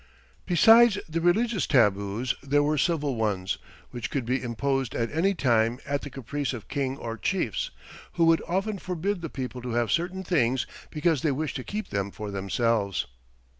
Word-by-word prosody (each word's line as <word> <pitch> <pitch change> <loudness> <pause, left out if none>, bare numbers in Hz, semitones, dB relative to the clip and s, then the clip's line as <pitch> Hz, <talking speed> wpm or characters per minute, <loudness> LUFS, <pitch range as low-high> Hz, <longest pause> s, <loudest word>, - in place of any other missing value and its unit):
Besides 225 +4 +7
the 165 +1 -2
religious 210 +5 +2
tabus 105 -2 +2
there 145 +1 +2
were 150 0 +1
civil 150 -4 +1
ones, 100 -4 -1 0.3
which 120 -2 -4
could 135 -4 -2
be 125 +2 0
imposed 135 +2 -1
at 115 -1 -1
any 190 +6 +1
time 120 -4 +2
at 140 0 -1
the 145 - -7
caprice 135 +1 -3
of 115 -5 -7
king 135 -2 -2
or 115 -3 -5
chiefs, - - -1 0.4
who 170 -2 +3
would 165 0 +4
often 195 +4 -1
forbid 180 +2 -2
the 165 - -4
people 130 -2 -5
to 120 -1 -4
have 120 -3 +1
certain 180 - -1
things 130 -9 +1 0.2
because 155 -2 +1
they 155 - +2
wished 145 +1 -2
to 130 - -5
keep 210 - -5
them 100 0 -1
for 105 0 -7
themselves. 100 +1 0
135 Hz, 175 wpm, -27 LUFS, 115-165 Hz, 0.4 s, Besides